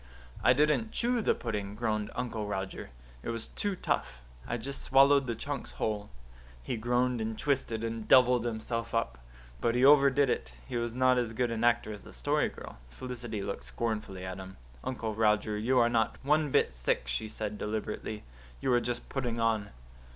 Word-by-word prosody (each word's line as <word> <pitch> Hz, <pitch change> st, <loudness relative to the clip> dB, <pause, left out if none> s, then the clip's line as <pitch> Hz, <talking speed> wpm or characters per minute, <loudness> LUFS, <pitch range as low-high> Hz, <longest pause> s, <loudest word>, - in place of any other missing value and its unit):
"I -, -, +7 dB
didn't 150 Hz, -, +2 dB
chew 240 Hz, 0 st, +1 dB
the -, -, +2 dB
pudding," 105 Hz, -4 st, -4 dB
groaned 110 Hz, -2 st, -1 dB
Uncle 115 Hz, -4 st, -3 dB
Roger. 95 Hz, -2 st, -4 dB, 0.3 s
"It -, -, -5 dB
was 115 Hz, -1 st, -3 dB
too 205 Hz, -2 st, -2 dB
tough 60 Hz, -, -2 dB, 0.2 s
I 120 Hz, -, -1 dB
just 135 Hz, +4 st, -5 dB
swallowed 140 Hz, 0 st, +5 dB
the 115 Hz, -, -1 dB
chunks 140 Hz, +4 st, -5 dB
whole." 105 Hz, -2 st, -2 dB, 0.5 s
He -, -, -2 dB
groaned 120 Hz, +1 st, +1 dB
and 110 Hz, 0 st, -3 dB
twisted 115 Hz, -6 st, -1 dB
and 115 Hz, -1 st, -4 dB
doubled 125 Hz, -2 st, +6 dB
himself 115 Hz, 0 st, -3 dB
up. 65 Hz, -, -1 dB, 0.4 s
But 115 Hz, -, +1 dB
he 125 Hz, +2 st, +4 dB
overdid 140 Hz, -1 st, +6 dB
it. 65 Hz, -1 st, -2 dB
He -, -, -6 dB
was 120 Hz, 0 st, -2 dB
not 130 Hz, 0 st, +4 dB
as 115 Hz, -2 st, -2 dB
good 120 Hz, +1 st, 0 dB
an 115 Hz, 0 st, -2 dB
actor 120 Hz, -2 st, +2 dB
as 105 Hz, -, -10 dB
the -, -, -12 dB
Story -, -, +1 dB
Girl. -, -, -11 dB
Felicity 115 Hz, -, -5 dB
looked 100 Hz, -, -4 dB
scornfully 105 Hz, -5 st, -3 dB
at 95 Hz, +1 st, -5 dB
him. 95 Hz, 0 st, -9 dB, 0.3 s
"Uncle 115 Hz, -4 st, -3 dB
Roger, 105 Hz, -1 st, +2 dB
you 120 Hz, +5 st, +1 dB
are 120 Hz, -1 st, +6 dB
not 115 Hz, -1 st, +1 dB
one 150 Hz, +2 st, +3 dB
bit 130 Hz, -, +2 dB
sick," -, -, 0 dB
she 60 Hz, -, -2 dB
said 105 Hz, -1 st, -4 dB
deliberately. 105 Hz, 0 st, -4 dB, 0.4 s
"You 130 Hz, -, +1 dB
are 120 Hz, -, +4 dB
just 120 Hz, 0 st, -3 dB
putting 120 Hz, -4 st, -2 dB
on." 110 Hz, -3 st, +1 dB
115 Hz, 185 wpm, -30 LUFS, 105-125 Hz, 0.5 s, I